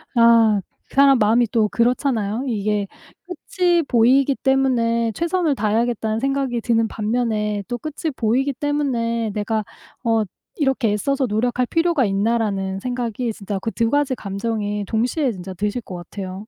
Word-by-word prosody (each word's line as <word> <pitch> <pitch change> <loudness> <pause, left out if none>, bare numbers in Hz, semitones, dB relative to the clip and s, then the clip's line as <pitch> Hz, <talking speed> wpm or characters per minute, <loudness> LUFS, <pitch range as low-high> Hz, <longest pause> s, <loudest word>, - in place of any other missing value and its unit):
아 230 -3 +5 0.3
그 - - -15
사람 275 -1 +6
마음이 225 +3 +4
또 220 -3 +3
그렇잖아요. 235 -1 0
이게 210 -3 -1 0.4
끝이 355 -1 0
보이기 265 +2 +3
때문에 245 -4 +1
'최선을 340 - 0
다해야겠다.'는 220 -1 0
생각이 270 -2 -1
드는 230 -1 +1
반면에 215 -2 -1
또 245 - -3
끝이 310 +5 -4
보이기 255 +5 +1
때문에 245 -5 -1
'내가 215 +1 -1 0.4
어 225 -2 +2 0.3
이렇게 270 -6 +1
애써서 265 +6 0
노력할 240 +3 0
필요가 330 -4 +2
있나.'라는 200 -2 0
생각이 245 0 -3
진짜 200 -2 -5
그 225 - -3
2 230 0 0
가지 285 -2 +1
감정이 205 0 -3
동시에 245 +6 0
진짜 190 -1 -7
드실 205 +6 -2
것 190 - -10
같아요. 190 +3 -7
230 Hz, 330 characters per minute, -21 LUFS, 210-265 Hz, 0.4 s, 사람